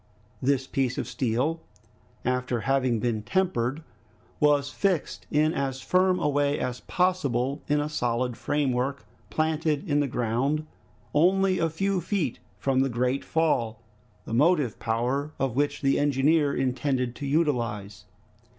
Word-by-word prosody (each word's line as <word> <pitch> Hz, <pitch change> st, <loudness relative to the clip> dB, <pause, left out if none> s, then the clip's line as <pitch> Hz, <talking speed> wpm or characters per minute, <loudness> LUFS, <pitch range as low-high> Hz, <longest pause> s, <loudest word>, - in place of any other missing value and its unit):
This 135 Hz, 0 st, +1 dB
piece 135 Hz, -2 st, -1 dB
of 120 Hz, -, -2 dB
steel, 130 Hz, +6 st, -1 dB, 0.6 s
after 125 Hz, -1 st, 0 dB
having 130 Hz, -2 st, +1 dB
been 115 Hz, -2 st, -1 dB
tempered, 150 Hz, -, 0 dB, 0.6 s
was 145 Hz, -2 st, +3 dB
fixed 185 Hz, -3 st, -1 dB
in 155 Hz, +2 st, +2 dB
as 135 Hz, -1 st, -2 dB
firm 185 Hz, +5 st, +2 dB
a 150 Hz, -, +1 dB
way 145 Hz, 0 st, +1 dB
as 125 Hz, -1 st, -3 dB
possible 140 Hz, -9 st, 0 dB
in 150 Hz, 0 st, +2 dB
a 145 Hz, -, -1 dB
solid 125 Hz, -4 st, -1 dB
framework 140 Hz, -1 st, -1 dB, 0.2 s
planted 155 Hz, -, 0 dB
in 145 Hz, -2 st, +2 dB
the 145 Hz, -, +1 dB
ground, 125 Hz, +6 st, 0 dB, 0.5 s
only 185 Hz, +4 st, +3 dB
a 165 Hz, -, +2 dB
few 195 Hz, +3 st, 0 dB
feet 170 Hz, -, -1 dB, 0.2 s
from 135 Hz, -1 st, +1 dB
the 135 Hz, 0 st, +2 dB
great 125 Hz, +3 st, 0 dB
fall, 120 Hz, -9 st, 0 dB, 0.5 s
the -, -, -6 dB
motive 145 Hz, -1 st, +2 dB
power 125 Hz, +6 st, -1 dB
of 135 Hz, -3 st, -1 dB
which 145 Hz, +1 st, 0 dB
the 135 Hz, 0 st, +3 dB
engineer 145 Hz, +1 st, +3 dB
intended 130 Hz, -1 st, -1 dB
to 140 Hz, -, -4 dB
utilize. 115 Hz, -, -1 dB
140 Hz, 140 wpm, -26 LUFS, 125-155 Hz, 0.6 s, was